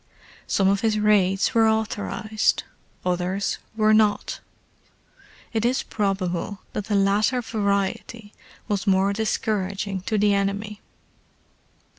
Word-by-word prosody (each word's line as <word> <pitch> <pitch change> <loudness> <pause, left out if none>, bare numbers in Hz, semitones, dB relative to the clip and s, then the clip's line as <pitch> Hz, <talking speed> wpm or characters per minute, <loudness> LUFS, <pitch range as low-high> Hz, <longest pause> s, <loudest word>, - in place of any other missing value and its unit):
Some 195 - +2
of 195 0 +2
his 220 -2 +1
raids 205 0 +2
were 225 -2 +4
authorized: 215 0 0 0.4
others 180 +2 -1 0.2
were 215 0 +4
not. 215 -1 +2 1.1
It 220 -1 0
is 250 +2 +1
probable 195 -2 -2
that 210 - -3
the 210 - -1
latter 205 +5 +2
variety 205 -1 -2 0.3
was 205 -1 -2
more 195 +1 +3
discouraging 200 -3 -2
to 215 - +1
the 205 0 +3
enemy. 200 +1 -2
205 Hz, 110 wpm, -24 LUFS, 195-215 Hz, 1.1 s, were